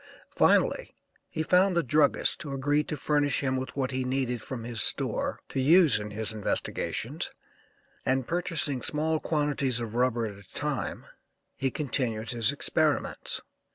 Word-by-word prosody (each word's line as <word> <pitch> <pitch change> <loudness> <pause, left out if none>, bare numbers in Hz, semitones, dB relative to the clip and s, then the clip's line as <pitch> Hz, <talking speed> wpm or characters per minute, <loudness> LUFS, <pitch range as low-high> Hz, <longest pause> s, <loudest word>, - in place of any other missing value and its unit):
Finally - - +2 0.3
he 160 - -2
found 180 +3 +3
a 170 - +3
druggist 145 +4 +2
who 150 -4 -6
agreed 145 +2 +1
to 150 - -3
furnish 145 0 +1
him 130 -1 0
what 135 -2 -1
he 130 0 -1
needed 125 -2 -1
from 120 -1 -6
his 115 -2 0
store - - +3
to - - -3
use 160 -3 +5
in 105 0 -6
his 110 +1 -3
investigations 105 -2 -2 0.7
and 130 -1 0
purchasing 165 -6 0
small 155 +4 0
quantities 145 -6 0
of 115 -2 -5
rubber 120 -1 +1
at 100 -2 -8
a - - -23
time 140 - -3 0.5
he 135 -1 0
continued 120 -5 -2
his 115 -3 +2
experiments. - - -1
135 Hz, 150 wpm, -28 LUFS, 120-150 Hz, 0.7 s, use